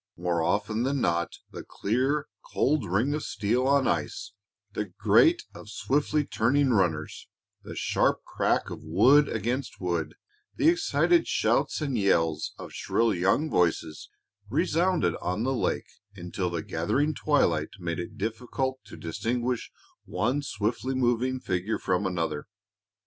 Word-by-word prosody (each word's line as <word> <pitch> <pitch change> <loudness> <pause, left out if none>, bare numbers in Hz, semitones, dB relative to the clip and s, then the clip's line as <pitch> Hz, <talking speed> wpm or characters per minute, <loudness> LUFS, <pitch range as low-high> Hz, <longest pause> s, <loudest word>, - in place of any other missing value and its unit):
More 85 -1 0
often 105 +6 0
than 135 +2 0
not 85 -5 0 0.2
the - - -7
clear, 135 +8 0 0.2
cold 135 - 0
ring 115 +10 +1
of 150 - -2
steel 115 +4 0
on 140 -1 +3
ice, 390 -1 -2 0.4
the - - -2
grate 340 0 +3
of 105 - -11
swiftly 145 +7 0
turning 135 +4 +2
runners, 85 -8 0 0.3
the - - -9
sharp - - +1
crack - - 0
of - - -7
wood 135 - +5
against 120 +5 -3
wood, 85 -4 -2 0.4
the 315 - +4
excited 345 0 +2
shouts - - +1
and 135 -6 -1
yells 80 -6 +1
of - - -9
shrill 115 -2 +1
young 95 - +2
voices, 85 - 0 0.4
resounded 170 - +1
on 90 +5 -1
the 135 +2 0
lake 125 - -1 0.2
until 90 0 -3
the 85 -2 -3
gathering 135 - 0
twilight 85 - +1
made 85 -2 -3
it 85 - -7
difficult 125 +5 -2
to - - -11
distinguish 120 +8 -2 0.4
one 125 +7 0
swiftly 115 +1 -2
moving 130 +1 +1
figure 95 +1 -2
from 95 +1 0
another. 85 -5 -2
115 Hz, 140 wpm, -27 LUFS, 90-140 Hz, 0.4 s, wood